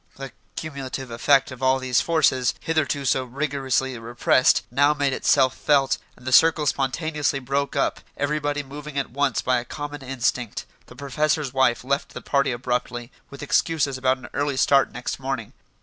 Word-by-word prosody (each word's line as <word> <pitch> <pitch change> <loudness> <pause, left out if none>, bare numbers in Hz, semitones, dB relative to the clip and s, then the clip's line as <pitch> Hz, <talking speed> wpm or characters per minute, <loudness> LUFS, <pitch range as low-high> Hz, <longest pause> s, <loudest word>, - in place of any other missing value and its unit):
The 135 -1 -8 0.2
cumulative 135 -4 -6
effect 135 +4 +3
of 130 0 -10
all 130 0 +3
these 130 -2 +1
forces, 135 -7 +2
hitherto 155 -3 -1
so 130 0 +2
rigorously 135 -1 -2
repressed, 120 +2 +2
now 145 +4 +3
made 140 -2 0
itself 130 -2 +3
felt, 140 -2 +2 0.2
and 125 - -17
the 130 - -2
circle 160 +2 +5
spontaneously 140 +1 0
broke 140 +2 -2
up, - - 0 0.2
everybody 145 0 -1
moving 145 +1 -8
at 140 - -2
once 140 -1 0
by 125 -1 +2
a - - -6
common 145 +3 -7
instinct. 125 -3 -2 0.2
The - - -14
professor's 140 +1 -1
wife 130 -3 +2
left 140 +2 -2
the - - -6
party 140 -1 +1
abruptly, 120 0 -3 0.2
with 140 +1 -9
excuses 145 -2 +1
about 130 0 +1
an 130 -2 -11
early 145 -1 -1
start 135 0 +4
next 125 +2 -5
morning. 130 -5 -4
135 Hz, 165 wpm, -23 LUFS, 130-145 Hz, 0.2 s, circle